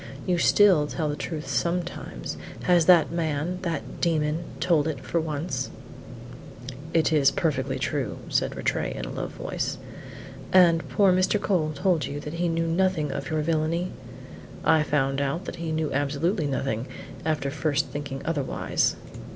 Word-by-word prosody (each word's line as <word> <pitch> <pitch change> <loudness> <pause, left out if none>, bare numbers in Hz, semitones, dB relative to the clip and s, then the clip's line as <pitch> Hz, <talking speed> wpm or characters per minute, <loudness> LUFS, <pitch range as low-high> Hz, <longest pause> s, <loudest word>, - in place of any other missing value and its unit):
You 180 -2 +1
still 185 -8 +5
tell 155 0 -2
the 145 - -1
truth 155 0 -5
sometimes; 175 0 -2 0.3
has 175 -3 +4
that 175 -3 +6
man 165 +1 -1
that 170 -5 -4
demon 160 -1 +1
told 160 -4 +2
it 150 -5 -3
for 170 - -1
once?" 155 +2 -3 1.2
"It 165 -1 +2
is 145 -3 +5
perfectly 145 -6 -1
true," 130 - -2
said - - 0
Rattray - - -1
in - - -4
a - - -6
low - - -3
voice. - - -4 0.7
"And 170 -3 +5
poor 195 -3 +4
Mr. 185 +3 +2
Cole 175 -7 +1
told 170 +1 +1
you 145 - -4
that 150 +1 -6
he 170 +1 0
knew 165 0 0
nothing 165 -3 +1
of - - -4
your 155 -1 0
villany?" 165 +3 0 0.7
"I 160 - +5
found 135 -2 +1
out 140 +7 -2
that - - -6
he 165 -1 -3
knew 155 -1 -1
absolutely 145 +5 0
nothing 130 -3 -2 0.4
after 150 -4 -1
first 155 0 0
thinking 145 -2 -5
otherwise." 145 -5 0
160 Hz, 155 wpm, -26 LUFS, 145-170 Hz, 1.2 s, that